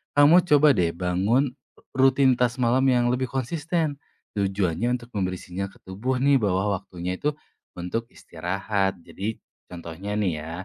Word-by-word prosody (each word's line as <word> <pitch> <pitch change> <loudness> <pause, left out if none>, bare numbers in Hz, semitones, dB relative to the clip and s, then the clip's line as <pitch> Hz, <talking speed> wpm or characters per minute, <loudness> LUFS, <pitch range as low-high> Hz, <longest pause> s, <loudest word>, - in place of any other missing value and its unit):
kamu 150 +5 +7
coba 150 -1 +6
deh 85 -2 +2
bangun 100 +10 +1 0.4
ru 135 0 +6
rutinitas 125 -2 +2
malam 125 +2 +3
yang 120 -1 +3
lebih 130 +1 -1
konsisten. 155 +4 -1 0.4
Tujuannya 100 +4 0
untuk 120 0 -14
memberi 95 -2 -1
sinyal 95 +2 -5
ke - - -21
tubuh 120 +8 -2
nih, 140 +1 +5
bahwa 100 0 +1
waktunya 90 -1 -5
itu 150 - +1 0.5
untuk 90 +7 -3
istirahat. 95 +3 -2
Jadi, 105 +6 -5 0.3
contohnya 90 +4 -6
nih 95 -5 +1
ya, 80 - -7
105 Hz, 145 wpm, -25 LUFS, 95-130 Hz, 0.5 s, kamu